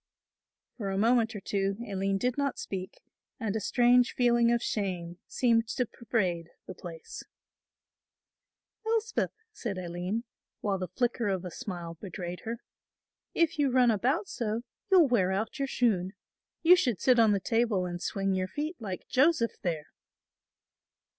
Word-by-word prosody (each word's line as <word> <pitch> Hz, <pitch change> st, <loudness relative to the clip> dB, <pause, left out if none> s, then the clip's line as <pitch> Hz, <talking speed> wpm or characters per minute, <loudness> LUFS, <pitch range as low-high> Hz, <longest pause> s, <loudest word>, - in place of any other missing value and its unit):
For 205 Hz, -5 st, -3 dB
a 195 Hz, -, -1 dB
moment 230 Hz, +1 st, +3 dB
or -, -, -3 dB
two 195 Hz, 0 st, -1 dB
Aline 195 Hz, 0 st, 0 dB
did 245 Hz, +4 st, 0 dB
not 280 Hz, -2 st, -1 dB
speak 190 Hz, -1 st, -6 dB, 0.4 s
and 220 Hz, -3 st, -2 dB
a -, -, +1 dB
strange 245 Hz, +3 st, +4 dB
feeling 240 Hz, -1 st, +4 dB
of 235 Hz, -, +3 dB
shame 180 Hz, -4 st, -2 dB
seemed 230 Hz, -2 st, +2 dB
to 250 Hz, +2 st, 0 dB
pervade 185 Hz, -8 st, -2 dB, 0.2 s
the -, -, -7 dB
place. 170 Hz, -3 st, -9 dB, 1.6 s
"Elspeth," 450 Hz, +1 st, 0 dB, 0.2 s
said 220 Hz, -, -4 dB
Aline, 180 Hz, +5 st, -3 dB, 0.4 s
while 200 Hz, -2 st, -1 dB
the 185 Hz, -, -3 dB
flicker 235 Hz, +4 st, 0 dB
of 190 Hz, -2 st, -1 dB
a 180 Hz, -, -5 dB
smile 170 Hz, -3 st, -6 dB
betrayed 180 Hz, -2 st, -5 dB
her, 230 Hz, +1 st, -4 dB, 0.7 s
"if 330 Hz, -2 st, +2 dB
you 285 Hz, -2 st, +4 dB
run 250 Hz, -2 st, +5 dB
about 260 Hz, -, +1 dB
so, 225 Hz, -1 st, -2 dB, 0.3 s
you'll 365 Hz, -6 st, +7 dB
wear 200 Hz, -7 st, +2 dB
out 215 Hz, +6 st, -2 dB
your 275 Hz, -, 0 dB
shoon; 200 Hz, -8 st, +1 dB, 0.5 s
you 350 Hz, +2 st, +9 dB
should 245 Hz, -, +1 dB
sit 255 Hz, -2 st, +4 dB
on 225 Hz, -2 st, +6 dB
the 200 Hz, -, +2 dB
table 225 Hz, -3 st, +1 dB
and 175 Hz, -1 st, -5 dB
swing 195 Hz, 0 st, -1 dB
your 185 Hz, 0 st, 0 dB
feet 305 Hz, -, -4 dB
like 195 Hz, -5 st, -6 dB
Joseph 270 Hz, -3 st, +2 dB
there." 160 Hz, -4 st, -2 dB
215 Hz, 155 wpm, -29 LUFS, 185-245 Hz, 1.6 s, you